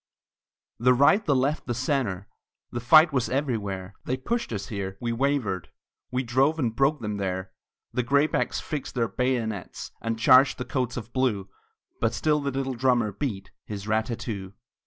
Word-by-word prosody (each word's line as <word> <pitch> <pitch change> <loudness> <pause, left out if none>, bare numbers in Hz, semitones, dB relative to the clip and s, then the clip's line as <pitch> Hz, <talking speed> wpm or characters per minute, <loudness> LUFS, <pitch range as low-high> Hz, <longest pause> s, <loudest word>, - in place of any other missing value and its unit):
The 125 +2 +5
right, 145 - +5
the 145 -6 +2
left, 135 +3 0
the 120 - -1
centre, 120 -7 -1 0.4
The 120 - -3
fight 155 +6 +6
was 130 -3 +1
everywhere; 105 -9 -2
They 130 - -1
pushed 235 - -2
us 100 -3 -4
here, 95 -2 -4
we 120 -1 -2
wavered, 115 -8 0 0.4
We 125 +1 -1
drove 135 +6 +2
and 120 -7 -1
broke 140 +3 +2
them 105 -2 -3
there. 95 -1 -3 0.4
The 125 - +1
graybacks 140 +5 +1
fixed 150 -3 -5
their 115 -2 +1
bayonets, 110 -2 -2
And 115 0 -2
charged 130 +4 +6
the 125 - -4
coats 125 -2 -2
of 120 0 -7
blue, 110 -7 0 0.5
But 115 0 +1
still 150 -1 +2
the 140 -1 -2
little 135 0 -2
drummer 120 -3 +2
beat 100 -2 -4
His 105 -1 -7
rat 110 0 +1
tat 115 - -3
too! 100 -5 -6
125 Hz, 175 wpm, -26 LUFS, 105-135 Hz, 0.5 s, fight